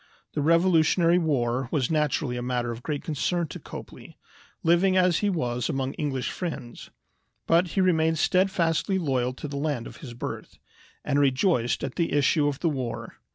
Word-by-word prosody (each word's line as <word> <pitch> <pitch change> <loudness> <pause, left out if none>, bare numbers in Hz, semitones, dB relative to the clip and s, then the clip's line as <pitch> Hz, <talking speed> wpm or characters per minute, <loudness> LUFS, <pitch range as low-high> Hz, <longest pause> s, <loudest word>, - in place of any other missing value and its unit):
The 150 - -1
Revolutionary 170 +1 +4
War 130 -6 0
was 140 -4 0
naturally 150 -4 0
a 120 - -3
matter 120 -1 -1
of 115 +1 -7
great 145 +1 -3
concern 170 +3 -1
to - - -7
Copley, - - -11 0.5
living 180 +3 +3
as 180 -2 +3
he 205 - +1
was 125 - -1
among 135 0 -2
English 135 -5 -2
friends; 155 -9 -6 0.6
but 170 +2 +3
he - - +5
remained 160 -3 +2
steadfastly 185 +1 +1
loyal 130 -7 0
to 140 - -7
the 140 0 -5
land 140 -5 -2
of 115 - -10
his 130 -5 -9
birth, 120 - -6 0.5
and 145 -1 +1
rejoiced 135 - +2
at 135 -2 -4
the 170 - 0
issue 145 +1 +3
of 140 -2 -3
the 170 - +2
war. 130 -5 -5
150 Hz, 170 wpm, -26 LUFS, 130-170 Hz, 0.6 s, he